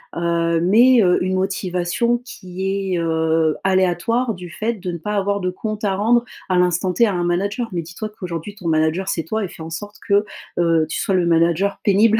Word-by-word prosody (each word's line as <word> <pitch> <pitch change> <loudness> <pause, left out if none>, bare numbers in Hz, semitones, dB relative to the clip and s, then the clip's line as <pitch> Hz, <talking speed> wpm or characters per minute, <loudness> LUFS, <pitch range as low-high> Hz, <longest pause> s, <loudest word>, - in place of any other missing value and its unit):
heu, 170 -1 +1
mais 235 +7 +5
heu, 180 -3 +4
une 185 - -1
motivation 185 +4 0
qui 190 -2 -4
est, 175 - 0
heu, 160 -1 +1
aléatoire, 190 +6 +1
du 180 -1 -9
fait 220 +6 -2
de 185 -3 -5
ne 170 - -5
pas 210 +5 -3
avoir 200 0 0
de 185 -1 -1
compte 215 +3 -5
à 195 -2 +1
rendre 235 +4 +3 0.3
à 185 - +2
l'instant 180 +1 +1
T 235 +6 +4
à 205 - -1
un 175 - -1
manager. 200 +7 -1
Mais 175 -2 -2
dis-toi 180 +6 -7
qu'aujourd'hui, 180 -2 -6
ton 195 -5 -8
manager 160 +4 +1
c'est 165 - -1
toi, 220 +5 -2
et - - -2
fais 160 - -10
en 165 - -8
sorte 205 +5 -6
que, 205 0 +4 0.4
heu, 165 -2 +3
tu - - -3
sois 195 - 0
le 180 -2 +2
manager 170 +4 +2
pénible 215 +2 +4
185 Hz, 210 wpm, -20 LUFS, 170-205 Hz, 0.4 s, mais